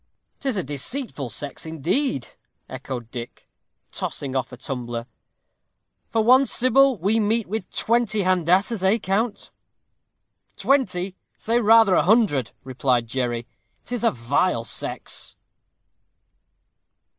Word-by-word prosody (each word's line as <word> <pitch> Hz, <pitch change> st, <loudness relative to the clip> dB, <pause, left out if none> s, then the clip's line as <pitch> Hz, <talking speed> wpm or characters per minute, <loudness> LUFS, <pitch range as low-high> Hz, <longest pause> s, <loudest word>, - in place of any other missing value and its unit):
"'Tis 265 Hz, -6 st, -2 dB
a 185 Hz, -, 0 dB
deceitful 145 Hz, -, -3 dB
sex, 140 Hz, +7 st, -6 dB
indeed," 160 Hz, -, -1 dB, 0.4 s
echoed 125 Hz, -2 st, -7 dB
Dick, 120 Hz, -1 st, -8 dB, 0.4 s
tossing 135 Hz, -2 st, -4 dB
off 130 Hz, -1 st, -1 dB
a 125 Hz, -, -9 dB
tumbler. 120 Hz, -3 st, -5 dB, 1.0 s
"For 225 Hz, -, +1 dB
one 255 Hz, +4 st, +6 dB
Sybil 260 Hz, +1 st, +4 dB
we 200 Hz, +6 st, +1 dB
meet 220 Hz, +1 st, +1 dB
with 205 Hz, -1 st, -4 dB
twenty 225 Hz, -3 st, +1 dB
Handassahs, 185 Hz, +4 st, +2 dB
eh, 190 Hz, +4 st, +3 dB
count?" 205 Hz, +2 st, -2 dB, 1.1 s
"Twenty! 195 Hz, -9 st, +1 dB, 0.2 s
say 230 Hz, +2 st, +1 dB
rather 225 Hz, -2 st, +6 dB
a -, -, +5 dB
hundred," 185 Hz, -, +3 dB
replied 130 Hz, -2 st, 0 dB
Jerry. 120 Hz, -1 st, -2 dB, 0.4 s
"'Tis 245 Hz, 0 st, -4 dB
a 230 Hz, -, +5 dB
vile 120 Hz, +3 st, 0 dB
sex." -, -, -4 dB
185 Hz, 110 wpm, -23 LUFS, -, 1.1 s, one